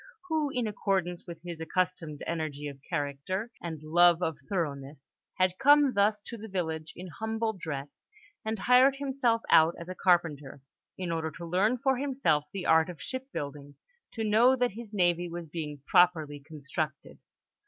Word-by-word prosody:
who, 310 -2 +1
in 250 -3 -1
accordance 190 -4 -1
with 170 -2 -8
his 170 -2 -7
accustomed 165 -3 -2
energy 155 -3 -3
of 140 -1 -9
character 165 - -3
and 160 -3 -6
love 175 +2 +5
of 160 -3 0
thoroughness, 145 -6 -4 0.3
had 185 0 +1
come 290 -1 +6
thus 205 +1 +2
to 235 - -8
the 220 +1 -8
village 160 -5 -3
in 180 - -8
humble 220 +5 -2
dress 145 -6 -7 0.4
and 220 0 -2
hired 250 +6 +5
himself 265 -5 0
out 160 +1 +6
as 170 - -9
a 185 - -5
carpenter, 165 -7 +1 0.4
in 180 -2 -3
order 160 -1 -1
to 170 +2 -9
learn 195 +8 +2
for 265 +1 +1
himself 260 - +1
the 195 -2 -5
art 160 +2 +4
of 175 - -8
shipbuilding, 145 - -6 0.4
to 225 - -4
know 225 +5 +5
that 245 -1 +1
his 220 +1 -9
navy 175 -3 +1
was 170 0 -6
being 150 -3 -6
properly 160 -5 +3
constructed. 150 0 -5
175 Hz, 165 wpm, -29 LUFS, 155-220 Hz, 0.4 s, come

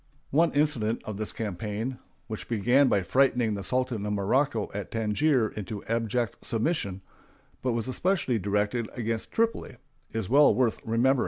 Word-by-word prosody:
One 165 +4 +4
incident 130 -7 +1
of 105 -2 -5
this 110 0 -3
campaign, 110 +3 -4 0.3
which 110 -2 -7
began 120 +5 +3
by 100 -5 +2
frightening 125 -1 +2
the 100 - -3
Sultan 125 -1 -1
of 105 0 -1
Morocco 110 +4 +1
at 100 -2 -5
Tangier 115 +3 +1
into 105 0 -6
abject 115 0 -1
submission, 110 - -1 0.6
but 125 -2 0
was 115 +1 -2
especially 130 - +1
directed 105 +4 0
against 115 -1 -2
Tripoli, 225 - 0 0.4
is 110 -4 -3
well 140 -1 +6
worth 120 -1 +1
remembering. 125 +4 +2
115 Hz, 150 wpm, -27 LUFS, 105-130 Hz, 0.6 s, well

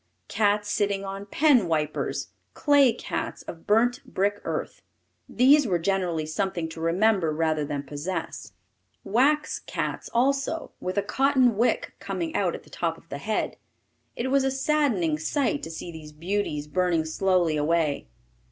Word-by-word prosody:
Cats 205 -1 +1
sitting 200 -1 0
on 195 +1 -6
pen 260 - +4
wipers; 155 -2 -1 0.3
clay 285 -4 +5
cats - - -5
of 165 - -10
burnt 245 +5 +3
brick 205 -5 -1
earth. - - -4 0.5
These 275 +2 +5
were 180 -4 +2
generally 175 -3 0
something 170 +1 -2
to 160 0 -8
remember 180 0 +2
rather 155 -1 0
than 145 -1 -3
possess. 145 - -5 0.5
Wax 285 +9 +2
cats - - -4
also, 275 +6 0
with 185 +1 -4
a 200 - +2
cotton 260 0 +3
wick 235 +4 +1
coming 330 -1 -4
out - - +1
at - - -10
the - - -20
top - - -2
of - - -21
the - - -5
head. - - -2 0.6
It 260 +2 -2
was 275 -1 +4
a 270 - +2
saddening 265 - +1
sight 235 - 0
to 160 - -6
see 165 +1 -7
these 155 -2 -10
beauties 165 -2 -2
burning 170 0 +1
slowly 175 0 +1
away. 150 -1 0
195 Hz, 150 wpm, -26 LUFS, 160-250 Hz, 0.6 s, clay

